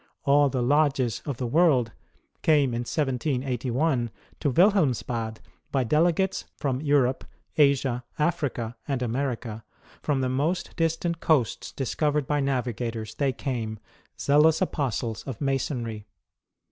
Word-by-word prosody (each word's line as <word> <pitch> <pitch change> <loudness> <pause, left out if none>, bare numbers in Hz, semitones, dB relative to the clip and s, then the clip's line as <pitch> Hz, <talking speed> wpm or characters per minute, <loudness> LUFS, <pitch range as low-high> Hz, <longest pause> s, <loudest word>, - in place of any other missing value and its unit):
All 145 0 +5
the 130 -2 -1
lodges 135 -3 +2
of 140 -4 -2
the 130 - -2
world 130 -4 +3 0.5
came 145 -5 +3
in 120 - -1
1781 130 0 0 0.3
to 145 - +1
Wilhelmsbad 125 - +2 0.3
by 135 -2 +2
delegates 170 - +1
from 135 -2 -1
Europe, 140 -4 +2 0.3
Asia, 135 -4 +3
Africa, 135 -7 -1
and 135 -3 -1
America; 120 -3 -3 0.4
from 140 -3 0
the 130 - +1
most 150 +8 -1
distant 165 +1 0
coasts 140 -8 +1
discovered 145 +2 0
by 145 +2 0
navigators, 120 -5 -2
they 140 -2 +1
came, 115 -4 -3 0.4
zealous 150 +3 +4
apostles 130 - -1
of 130 - -5
Masonry 125 -6 -2
135 Hz, 120 wpm, -26 LUFS, 120-150 Hz, 0.5 s, All